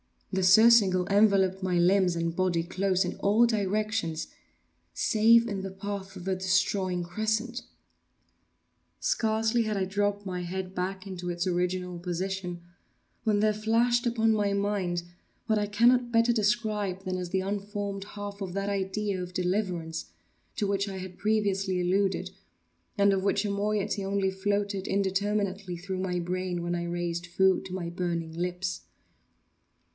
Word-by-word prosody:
The 190 - +1
surcingle 195 -2 +6
enveloped 195 -2 +3
my 185 -1 0
limbs 180 0 +3
and 165 0 -1
body 180 -2 +1
close 190 +2 0
in 180 - -4
all 215 +4 +4
directions—save 215 +2 0
in 200 -4 -3
the 195 - -4
path 195 0 -6
of 185 - -8
the 190 0 0
destroying 185 -1 +1
crescent. 220 +6 -2 1.4
Scarcely 220 +1 +1
had 215 -1 -2
I 195 - +1
dropped 205 +1 -1
my 180 -2 -3
head 185 +1 -4
back 190 +1 -3
into 180 -2 -5
its 175 +1 -2
original 180 0 -1
position, 180 0 -3 0.6
when 210 -2 +2
there 215 0 +3
flashed 235 +3 +2
upon 225 -1 +2
my 205 -2 +1
mind 200 -4 -1 0.4
what 220 -2 +2
I 205 - -1
cannot 240 +3 +3
better 230 +1 +4
describe 210 -3 0
than 185 -1 -2
as 180 -1 -4
the 190 +1 0
unformed 200 0 -4
half 205 0 -6
of 185 -2 -4
that 195 +1 -2
idea 195 0 -2
of 180 0 -7
deliverance 180 -4 -2 0.5
to 210 - 0
which 200 0 0
I 190 - -5
have 185 -1 -8
previously 200 -3 0
alluded, 185 0 0 0.7
and 200 0 +4
of 190 -1 0
which 200 +1 +1
a 205 - -1
moiety 205 0 -1
only 195 0 0
floated 200 0 -1
indeterminately 200 -1 -1
through 185 +1 -5
my 185 -1 -1
brain 180 0 -2
when 175 0 -2
I 175 0 -2
raised 175 0 -3
food 190 +2 +2
to 185 - -7
my 175 -2 -3
burning 170 -2 -3
lips. 180 +2 -3
195 Hz, 150 wpm, -28 LUFS, 180-205 Hz, 1.4 s, surcingle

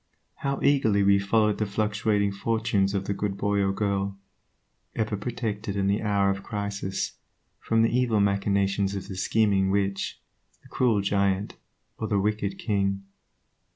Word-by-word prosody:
How 140 0 -2
eagerly 110 -8 +3
we 100 0 +5
followed 105 +1 +2
the 105 - 0
fluctuating 105 0 0
fortunes 105 -1 0
of 95 -1 -1
the 100 - -1
good 100 0 -3
boy 100 0 0
or 95 -1 +2
girl, 100 -1 -1 0.8
ever 110 -1 -1
protected, 105 -2 -3
in 100 -1 0
the 100 +2 +1
hour 100 -2 +2
of 95 0 -4
crisis, 100 -2 -4 0.4
from 115 0 +2
the 115 - +2
evil 120 -4 +2
machinations 100 0 +1
of 95 - -5
the 95 - -6
scheming 100 0 +2
witch, 100 0 -1 0.4
the - - -18
cruel 115 -5 +2
giant, 100 0 0 0.4
or 110 - -2
the 105 - +1
wicked 100 -1 -1
king. 100 -2 -1
100 Hz, 155 wpm, -26 LUFS, 100-110 Hz, 0.8 s, we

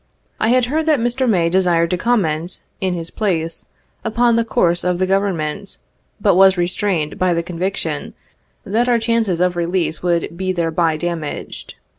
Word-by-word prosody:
I - - +1
had 250 +1 +3
heard 310 +5 -1
that 305 -4 +4
Mr. 245 +2 0
May 175 -6 +3
desired 170 -2 +2
to - - +2
comment, 180 -6 -1 0.2
in 190 -3 -1
his 165 -1 -6
place, 165 -6 -2 0.4
upon 235 +1 +2
the 230 - +2
course 175 -6 +1
of 180 -1 0
the 185 - +1
Government, 190 -2 -1 0.4
but 200 -1 +3
was 190 +1 +5
restrained 175 -3 -1
by 185 -2 +2
the 170 - -1
conviction 180 +3 -3 0.5
that 225 +5 +1
our 240 - +4
chances 225 -6 0
of 180 0 +1
release 170 -1 -1
would 170 -1 -1
be 185 +1 -2
thereby 165 -2 0
damaged. 170 -2 -5
185 Hz, 165 wpm, -19 LUFS, 170-220 Hz, 0.5 s, was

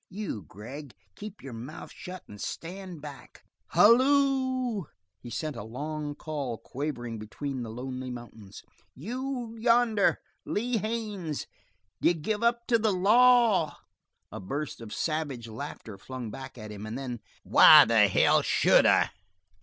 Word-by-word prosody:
You 195 - -5
Gregg, 125 - -10 0.2
keep 210 -1 -10
your 135 -3 -8
mouth 125 +8 -8
shut 185 -2 -9
and 105 -1 -11
stand 180 -2 -7
back. 140 -4 -11 0.2
Halloo!" 260 - +3 0.3
He 120 - -10
sent 145 +6 -4
a 115 - -6
long 145 +6 -5
call 145 -7 -4
quavering 120 -5 -5
between 130 +5 -5
the 115 - -5
lonely 130 +2 -6
mountains. 115 -5 -10 0.3
"You 245 - -5
yonder 230 -3 +3 0.3
Lee 235 +3 -1
Haines! 210 -8 -3 0.6
D'you 175 - +4
give 210 +7 -2
up 235 0 +1
to 230 -2 +3
the 215 -1 +2
law?" 215 -3 +4 0.5
A - - -6
burst 140 +8 -5
of 110 -2 -9
savage 145 -7 -3
laughter 110 -3 -8
flung 125 -1 -7
back 130 +1 -9
at 110 -2 -8
him, 105 +1 -7
and 110 +3 -5
then: 125 -3 -5 0.2
"Why - - +9
the - - +5
hell - - +4
should - - +4
I?" - - +4
155 Hz, 140 wpm, -28 LUFS, -, 0.6 s, Why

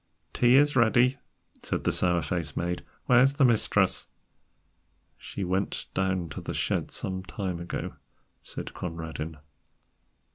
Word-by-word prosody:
"Tea 120 +1 +5
is 145 +1 +5
ready," 125 +2 +4 0.4
said - - -3
the - - +2
sour 90 -2 +2
faced 85 0 -3
maid; 90 0 -2 0.2
"where 125 0 +6
is 135 +2 +4
the 140 -2 +5
mistress?" 115 -3 +2 1.1
"She 100 - -6
went 95 +2 -1
down 95 -3 0
to 70 - -6
the - - -5
shed - - 0
some 95 -1 -4
time 95 -2 -4
ago," 85 0 -5 0.4
said - - -7
Conradin. 80 -2 -5
95 Hz, 135 wpm, -28 LUFS, 85-120 Hz, 1.1 s, where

